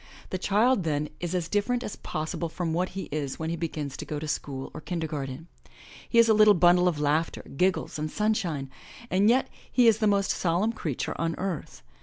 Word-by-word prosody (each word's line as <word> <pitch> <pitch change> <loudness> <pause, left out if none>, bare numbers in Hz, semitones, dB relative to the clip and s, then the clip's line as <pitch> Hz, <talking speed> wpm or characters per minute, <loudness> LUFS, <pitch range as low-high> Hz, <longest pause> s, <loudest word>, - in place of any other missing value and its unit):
The 185 - -2
child 215 +5 +3
then 150 -3 -1
is 175 +1 -3
as 175 -3 -1
different 240 +6 0
as 210 - -5
possible 155 +2 -3
from 165 0 -3
what 180 +3 0
he 195 - -2
is 145 -2 -3
when 160 0 -3
he - - -1
begins 155 -4 -4
to - - -5
go 150 - -4
to 155 +1 -5
school 135 -3 -4
or - - -7
kindergarten. 155 -3 -4 0.6
He 235 - +1
is 230 0 +7
a 220 - +5
little 215 -1 +7
bundle 175 +1 +5
of 165 -4 0
laughter, 150 +3 0
giggles 185 -1 0
and 155 +1 -2
sunshine, 175 -10 -1 0.4
and 195 +3 +4
yet 255 +3 +3 0.2
he 245 -2 +5
is 220 -1 +5
the 215 - +2
most 200 -1 +2
solemn 185 +6 +1
creature 155 - -3
on 165 -1 0
earth. 180 - -4
175 Hz, 205 wpm, -27 LUFS, 155-205 Hz, 0.6 s, is